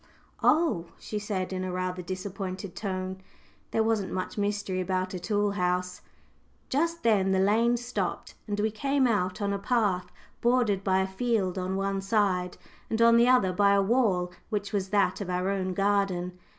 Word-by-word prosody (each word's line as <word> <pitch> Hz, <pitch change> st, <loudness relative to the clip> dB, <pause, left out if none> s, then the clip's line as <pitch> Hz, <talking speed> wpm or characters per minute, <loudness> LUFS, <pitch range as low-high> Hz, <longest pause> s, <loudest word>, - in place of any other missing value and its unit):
"Oh," 305 Hz, -, +3 dB
she 210 Hz, -, -5 dB
said 195 Hz, -3 st, -3 dB
in 185 Hz, 0 st, -2 dB
a 185 Hz, -, -3 dB
rather 185 Hz, 0 st, -2 dB
disappointed 185 Hz, 0 st, -5 dB
tone. 190 Hz, -2 st, -4 dB, 0.5 s
There 225 Hz, -, +1 dB
wasn't 220 Hz, -4 st, 0 dB
much 185 Hz, +5 st, -3 dB
mystery 205 Hz, -3 st, -1 dB
about 185 Hz, 0 st, -1 dB
a 185 Hz, -, -3 dB
tool 205 Hz, +2 st, 0 dB
house! 180 Hz, -1 st, -1 dB, 0.7 s
Just 335 Hz, +4 st, 0 dB
then 195 Hz, -4 st, +3 dB
the 190 Hz, -, +2 dB
lane 225 Hz, +5 st, +3 dB
stopped, 245 Hz, +1 st, -3 dB
and 205 Hz, 0 st, -2 dB
we 215 Hz, +1 st, +1 dB
came 275 Hz, +5 st, +1 dB
out 205 Hz, -4 st, 0 dB
on 200 Hz, 0 st, 0 dB
a 200 Hz, -, -2 dB
path 195 Hz, -5 st, 0 dB, 0.3 s
bordered 235 Hz, -5 st, +2 dB
by 190 Hz, -1 st, +2 dB
a 190 Hz, -, 0 dB
field 195 Hz, -2 st, 0 dB
on 185 Hz, +1 st, -2 dB
one 195 Hz, 0 st, -1 dB
side, 195 Hz, -3 st, 0 dB, 0.3 s
and 220 Hz, -, -1 dB
on 230 Hz, 0 st, +6 dB
the 235 Hz, +1 st, +5 dB
other 250 Hz, -8 st, +4 dB
by 200 Hz, +2 st, +4 dB
a 200 Hz, -, +4 dB
wall 195 Hz, -6 st, +2 dB, 0.2 s
which 205 Hz, -1 st, -3 dB
was 195 Hz, -2 st, -1 dB
that 205 Hz, +1 st, +1 dB
of 190 Hz, -, -4 dB
our 180 Hz, +2 st, 0 dB
own 185 Hz, -2 st, -2 dB
garden. 195 Hz, -3 st, 0 dB
195 Hz, 175 wpm, -28 LUFS, 185-220 Hz, 0.7 s, on